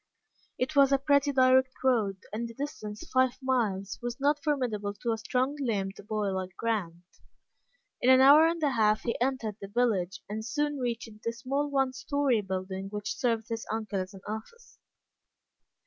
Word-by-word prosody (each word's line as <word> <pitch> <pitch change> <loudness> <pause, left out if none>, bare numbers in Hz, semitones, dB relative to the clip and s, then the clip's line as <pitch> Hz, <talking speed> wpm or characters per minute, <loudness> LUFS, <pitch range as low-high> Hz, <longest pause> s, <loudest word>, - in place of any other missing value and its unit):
It 260 +4 -2
was 280 -1 +6
a 275 - +5
pretty 280 +1 +2
direct 260 -1 +4
road, 220 -7 +2 0.2
and 230 +2 -2
the 230 - -11
distance 215 -7 -6
five 260 -1 +3
miles 220 -7 -1
was 240 +1 -4
not 290 +1 +1
formidable 230 -9 -1
to 235 +3 -2
a 225 - 0
strong 255 +5 0
limbed 200 -7 -2
boy 210 -2 0
like 190 -1 -4
Grant. 185 -7 -2 1.0
In 250 - +3
an 260 0 +8
hour 290 +4 +8
and 335 -1 -2
a 290 - +3
half 215 -3 +2
he 235 - -1
entered 245 -5 -1
the 195 - -6
village, 200 -4 0
and 215 +2 -4
soon 295 +4 -1
reached 240 -2 -2 0.2
the 230 - -1
small 270 +5 -2
one 270 -2 +1
story 270 -3 +1
building 190 0 -4
which 205 +1 -4
served 230 -4 -1
his 230 0 -3
uncle 215 -3 -2
as 185 +2 -8
an 190 - -11
office. 220 - -8
235 Hz, 175 wpm, -29 LUFS, 210-270 Hz, 1.0 s, an